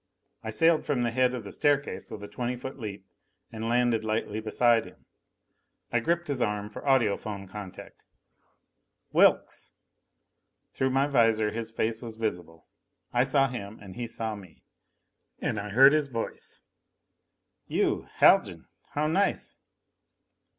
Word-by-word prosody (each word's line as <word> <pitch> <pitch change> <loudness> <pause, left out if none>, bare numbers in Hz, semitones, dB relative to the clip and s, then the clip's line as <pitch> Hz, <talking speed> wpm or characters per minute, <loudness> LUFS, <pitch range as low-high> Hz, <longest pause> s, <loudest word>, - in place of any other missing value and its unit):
I 110 - -4
sailed 165 +8 +3
from 135 -5 0
the 120 - 0
head 125 +1 +2
of 120 - -6
the 100 - -8
staircase 145 -1 0
with 100 - -8
a - - -6
twenty 125 +2 -3
foot 130 +2 -8
leap 100 -4 -7 0.5
and 115 0 -4
landed 120 -2 +2
lightly 110 -1 -2
beside 115 +1 +3
him. - - -16 0.9
I 120 - +2
gripped 170 +7 0
his 140 -4 -2
arm 105 -1 -1
for - - -8
audiphone 110 -6 0
contact. 95 -1 -10 1.1
"Wilks!" - - +2 1.0
Through 130 - 0
my 135 +1 +2
visor 115 -6 +3
his 115 0 -4
face 110 0 -2
was 115 -2 -7
visible. 90 -7 -4 0.5
I 120 0 +4
saw 135 0 +3
him 110 -4 -7
and 95 -2 -11
he 120 -1 -4
saw 110 -1 -4
me. 95 -5 -13 0.7
And 105 - -2
I 105 +1 -5
heard 135 +7 +7
his 155 -2 +2
voice: 115 -4 -6 1.0
"You, - - 0
Haljan. - - +4 0.3
How 150 +1 0
nice!" 185 +6 0
115 Hz, 145 wpm, -28 LUFS, 105-130 Hz, 1.1 s, heard